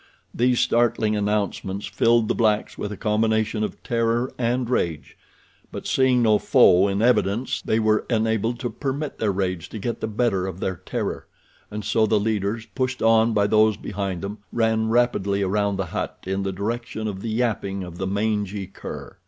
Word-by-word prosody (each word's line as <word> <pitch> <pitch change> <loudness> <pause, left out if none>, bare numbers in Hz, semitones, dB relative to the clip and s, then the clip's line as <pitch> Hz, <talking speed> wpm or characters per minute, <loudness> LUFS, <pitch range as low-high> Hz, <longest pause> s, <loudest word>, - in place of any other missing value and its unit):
These 125 +1 +2
startling 115 -2 +2
announcements 105 -1 -1
filled 115 -1 +2
the - - +1
blacks 110 -2 +1
with 105 - -4
a 105 - -6
combination 110 0 +1
of - - -5
terror 115 +1 0
and 120 +1 0
rage; 85 -11 -2 0.6
but, - - -7
seeing 130 -2 +3
no 110 -2 +4
foe 100 -8 +5
in 100 +2 0
evidence 120 -1 +1
they 110 - 0
were 110 -1 +2
enabled 110 0 0
to 120 - -2
permit 140 +1 -4
their 105 -2 +1
rage 95 -3 -2
to - - -7
get 115 +2 -4
the - - -1
better 105 -4 0
of 95 -1 -6
their 95 -2 -2
terror, - - -4 0.4
and 105 -1 -6
so 110 +1 +2
the 105 0 +3
leaders, 110 +1 -1
pushed 130 -1 -3
on 115 0 +4
by 100 -1 +3
those 110 0 +3
behind 100 -3 -4
them, 100 +2 -5
ran 110 -1 +1
rapidly 100 -4 +1
around 100 +1 0
the 95 -1 -2
hut - - -4
in 95 +1 -1
the 95 0 -2
direction 110 +3 -3
of 95 -2 -5
the 115 - -4
yapping 110 -4 -1
of 90 -1 -9
the 95 - -2
mangy 100 -1 -1
cur. 95 - -9
110 Hz, 180 wpm, -23 LUFS, 100-115 Hz, 0.6 s, foe